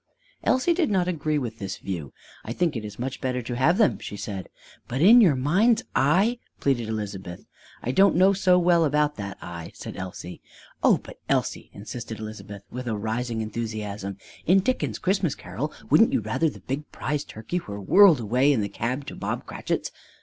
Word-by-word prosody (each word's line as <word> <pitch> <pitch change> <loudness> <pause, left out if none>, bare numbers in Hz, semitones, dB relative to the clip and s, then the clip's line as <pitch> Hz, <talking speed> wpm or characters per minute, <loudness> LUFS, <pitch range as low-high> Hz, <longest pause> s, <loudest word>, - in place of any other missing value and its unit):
Elsie 260 +7 +3
did 335 -3 +1
not 185 -3 +1
agree 155 -3 0
with 115 -5 -4
this 100 -1 -4
view. 85 -8 -5 0.3
"I 115 - -5
think 170 +1 0
it 115 - -3
is 105 -1 -8
much 130 +2 -4
better 125 -1 -1
to 120 +1 -4
have 155 +9 +3
them," 135 - +3
she 105 - -7
said. 100 -3 -6 0.4
"But 125 - -3
in 220 +10 +8
your 170 -10 +5
mind's 205 - +3
eye 190 - +3
" - - -45
pleaded 120 -5 0
Elizabeth. 100 -5 -5 0.4
"I 125 - -1
don't 195 +7 +5
know 190 +3 +5
so 185 -2 +4
well 175 -1 +4
about 150 0 +1
that 100 -2 -6
eye!" 85 -1 -7
said - - -8
Elsie. 90 -1 -7 0.4
"Oh, - - +5
but, - - -13
Elsie," - - 0
insisted 110 +2 -7
Elizabeth 105 -2 -8
with 125 0 -6
a 110 -2 -1
rising 110 +2 -2
enthusiasm, 105 -3 -4 0.3
"in 190 +3 +6
Dickens' 255 +6 -1
Christmas 185 -4 0
Carol - - -5 0.2
wouldn't - - +6
you - - +2
rather 165 - 0
the - - -12
big 140 +3 -5
prize 145 +3 -2
turkey 110 +11 -4
were 100 -10 -7
whirled 175 - +6
away 125 +6 +3
in 125 -6 +2
the 100 - -2
cab 125 +7 -3
to - - -7
the - - -10
Bob - - -3
Cratchits?" - - -3
125 Hz, 195 wpm, -25 LUFS, 105-175 Hz, 0.4 s, in